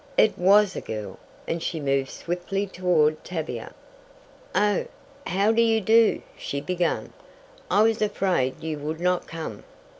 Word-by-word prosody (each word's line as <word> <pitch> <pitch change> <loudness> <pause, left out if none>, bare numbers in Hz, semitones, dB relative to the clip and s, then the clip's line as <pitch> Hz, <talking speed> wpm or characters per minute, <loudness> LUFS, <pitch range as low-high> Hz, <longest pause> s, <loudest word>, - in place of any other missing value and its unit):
It - - +5
was 195 +1 +4
a - - -3
girl, 105 -2 -6 0.3
and 165 0 -2
she 165 -1 -3
moved 135 -2 0
swiftly 180 +3 -3
toward 175 -5 +1
Tavia. 160 -3 -5 0.8
"Oh, 205 -2 +2 0.4
how 200 +4 +2
do 230 +1 +3
you 225 -1 +3
do?" 225 +2 +4
she 140 - -4
began. 175 +2 -1 0.6
"I 210 - +4
was 225 0 +2
afraid 185 -11 0
you 155 -2 -3
would 155 +2 -4
not 180 0 0
come." 160 -11 -7
180 Hz, 145 wpm, -25 LUFS, 155-205 Hz, 0.8 s, It